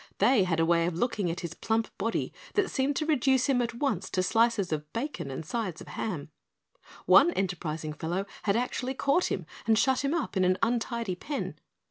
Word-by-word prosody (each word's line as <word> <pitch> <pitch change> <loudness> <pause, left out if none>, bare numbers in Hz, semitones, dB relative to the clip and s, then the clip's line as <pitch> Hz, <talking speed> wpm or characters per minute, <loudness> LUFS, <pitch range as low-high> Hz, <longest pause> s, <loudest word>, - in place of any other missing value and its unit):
They 210 -1 +4
had 165 -3 0
a 165 - +4
way 170 0 +3
of 175 - -2
looking 205 -2 0
at 170 +2 -3
his 170 -2 -5
plump 225 +4 -1
body 225 +3 -1 0.2
that 410 -3 +2
seemed 275 +1 0
to 310 - 0
reduce 265 -4 +3
him 265 -3 +2
at 235 -1 -2
once 235 - -1
to 185 - 0
slices 225 -2 +2
of 150 -1 -3
bacon 240 - -3
and 135 +4 -5
sides 190 -3 -3
of - - -10
ham. 160 -8 -4 0.7
One - - +7
enterprising 160 -5 -2
fellow 175 +5 -2 0.2
had 200 -1 +1
actually 250 +2 -1
caught 280 +7 +2
him 180 - -2 0.2
and 220 -1 +4
shut 265 +3 +2
him 280 +4 +1
up 330 - -2
in 190 - +3
an 185 0 +3
untidy 235 -3 0
pen. 285 +11 -4
220 Hz, 200 wpm, -29 LUFS, 175-255 Hz, 0.7 s, One